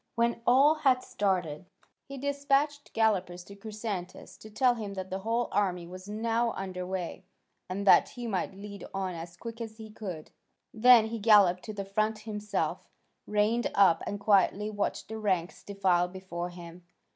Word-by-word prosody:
When 235 0 +1
all 275 +5 +6
had 260 -4 +3
started, 185 -5 -1 0.4
he 275 0 -8
despatched 285 +1 0
gallopers 190 -5 +1
to 200 - -12
Chrysantas 210 -3 -6
to 215 - -12
tell 245 +4 +3
him 210 -4 -6
that 190 -1 -6
the 190 - -2
whole 230 +4 0
army 180 -4 0
was 185 +3 -10
now 230 +2 0
under 185 -1 -5
way, 185 -1 -4 0.5
and 200 +2 -3
that - - +6
he 245 -1 -8
might 195 -3 -2
lead 200 0 -9
on 190 -1 -2
as 170 +1 -8
quick 230 +3 -8
as 220 -1 -7
he 220 -1 -10
could. 185 -8 -7 0.4
Then 235 0 +7
he 230 0 -4
galloped 200 -4 +5
to 215 - -6
the 200 -1 -5
front 215 +2 0
himself, 210 -1 -3 0.4
reined 210 +3 +1
up, 190 -5 +5
and 205 - -3
quietly 205 +1 +2
watched 205 -1 -2
the 220 0 -6
ranks 185 -5 -1
defile 190 -3 +1
before 180 -1 -6
him. 175 0 -11
205 Hz, 170 wpm, -29 LUFS, 185-225 Hz, 0.5 s, Then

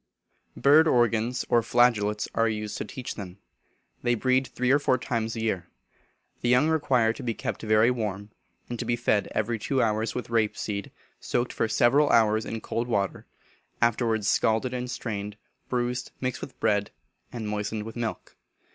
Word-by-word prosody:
Bird 155 +3 +6
organs, 120 -2 +2
or 120 - +4
flageolets, 110 -3 +2
are 115 0 +2
used 105 -1 -4
to - - -3
teach 125 +4 -6
them. 95 -3 -8 0.6
They 120 -1 +2
breed 130 +3 +1
three 125 +1 0
or 140 - +5
four 130 -3 +2
times 115 -2 -2
a 115 - -4
year. 95 -6 -1 0.7
The 120 - 0
young 125 +6 +4
require 130 -8 +2
to - - -9
be 115 -2 -2
kept - - -4
very 110 +2 +4
warm, 105 -4 -4 0.4
and 120 -1 -5
to - - -3
be 120 - +1
fed 110 -3 +1
every 115 +1 0
two 135 +5 -1
hours 110 -1 0
with 125 -1 -5
rape 110 -2 +1
seed, 100 -2 -4 0.3
soaked 120 0 -1
for - - 0
several 140 +6 +3
hours 110 -1 +3
in 115 -1 -4
cold 115 +2 -3
water, 100 -5 -1 0.5
afterwards 115 -2 +1
scalded 115 +4 +2
and 125 0 -3
strained, 105 -4 -5 0.3
bruised, 125 0 -1
mixed 130 -1 -3
with 135 - -9
bread, 100 -1 +1 0.4
and 115 -3 -5
moistened 105 0 -3
with 110 +1 -8
milk. 115 -2 -5
115 Hz, 175 wpm, -27 LUFS, 110-125 Hz, 0.7 s, Bird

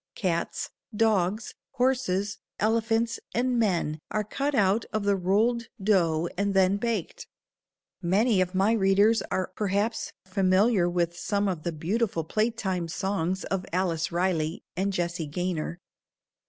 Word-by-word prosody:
Cats, 170 -4 -2 0.2
dogs, 210 -1 +1 0.2
horses, 245 -7 0 0.2
elephants 225 +1 +1 0.2
and 245 0 +1
men 170 -8 +1
are 215 - 0
cut 275 +7 -2
out 205 +1 +3
of 215 -2 -1
the 200 0 +3
rolled 220 +6 +1
dough 175 -5 +2
and 200 +1 0
then 190 +1 +4
baked. 220 -4 -3 0.7
Many 195 +3 +3
of 185 +1 -1
my 195 +3 +3
readers 205 +1 +4
are 185 -1 -1
perhaps 205 +2 -1
familiar 190 +1 +3
with 175 -1 0
some 200 +3 0
of 180 -5 -2
the 170 - -2
beautiful 170 +3 -1
playtime 190 -2 -1
songs 190 +1 -1
of 195 -1 -2
Alice 170 -2 0
Riley 170 -2 0
and 195 +2 0
Jessie 175 -3 -2
Gaynor. 175 +1 -3
195 Hz, 130 wpm, -27 LUFS, 175-220 Hz, 0.7 s, then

